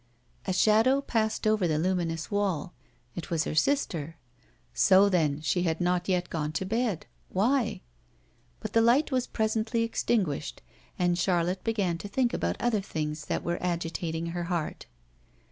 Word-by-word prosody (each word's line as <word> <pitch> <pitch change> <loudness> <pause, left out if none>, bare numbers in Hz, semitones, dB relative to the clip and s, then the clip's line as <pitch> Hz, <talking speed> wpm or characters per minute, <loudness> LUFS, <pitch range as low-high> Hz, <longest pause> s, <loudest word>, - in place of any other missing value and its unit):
A - - +1
shadow 220 +8 +4
passed 220 -5 -1
over 215 -4 +3
the 155 -2 +1
luminous 165 -1 -1
wall. 190 -5 -1 0.4
It 175 - -6
was 165 -2 +1
her - - -3
sister. 165 - 0 0.6
So 190 - +5
then, 155 -6 +1
she 175 +3 0
had 165 -2 0
not 180 +1 0
yet 180 -1 0
gone 155 -2 -2
to 175 +4 -2
bed. 220 -3 -1 0.2
Why? 235 +5 +1 0.8
But - - -5
the 225 - +5
light 250 +7 +4
was 255 -1 0
presently 220 +1 0
extinguished; 200 -9 -1 0.3
and 175 -1 +1
Charlotte 180 0 +1
began 200 -7 0
to 205 - -6
think 240 +4 0
about - - -1
other 230 -4 +1
things 150 -4 -4
that - - -2
were 175 0 -2
agitating 165 -1 -2
her 175 0 -3
heart. 170 -3 -3
180 Hz, 155 wpm, -28 LUFS, 165-220 Hz, 0.8 s, So